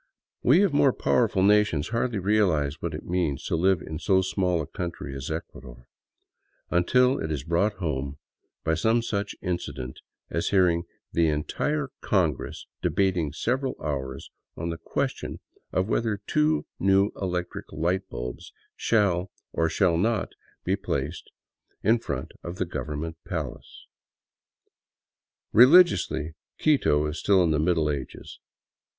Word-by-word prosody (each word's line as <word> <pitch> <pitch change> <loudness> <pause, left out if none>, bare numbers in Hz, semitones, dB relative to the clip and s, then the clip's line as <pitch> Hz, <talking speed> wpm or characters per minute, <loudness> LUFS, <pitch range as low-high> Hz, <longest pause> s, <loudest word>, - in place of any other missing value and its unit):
We 160 +11 +5
of 190 -7 +2
more 140 -2 +4
powerful 105 -6 +2
nations 105 -7 +3
hardly 115 0 0
realize 90 -8 +1
what - - -3
it - - -7
means 85 -6 -1
to - - 0
live 95 +1 +2
in 80 -1 -6
so 95 -2 +3
small 90 -2 0
a 80 - -2
country 85 -5 -5
as 70 0 -5
Ecuador, 60 -6 -7 0.9
until 125 +9 +3
it 80 - -3
is 70 -4 -2
brought 85 +7 +1
home 70 -7 -3 0.5
by 80 - +1
some 110 +8 +2
such 105 -3 -2
incident 75 -8 -4 0.3
as 85 - 0
hearing 90 -4 +3 0.3
the 85 -1 +3
entire 135 - -1
Congress 85 -9 0 0.2
debating 90 -6 +1
several 130 - -1
hours 65 -3 -4 0.3
on 85 +1 -3
the 85 -1 -4
questibn - - -3 0.3
of 95 +1 0
whether 110 -2 0
two 155 +4 +2
new 95 +2 +3
electric 90 -2 -4
light 90 +5 -1
bulbs - - -6 0.2
shall 95 -5 +1 0.2
or 80 0 +1
shall 85 0 +2
not 115 +4 0 0.3
be - - +1
placed 70 +5 -4 0.5
in 115 +3 +4
front 70 - -4
of 85 +1 -5
the 95 - -1
government 75 +1 -5
" - - -66
palace." - - -6 1.7
Religiously, 115 - +6 0.2
Quito 105 - +3
is 75 - -3
still 95 -3 +4
in 85 - +2
the 75 - +2
Middle 80 -1 +2
Ages. 70 -2 -7
90 Hz, 140 wpm, -26 LUFS, 75-105 Hz, 1.7 s, Religiously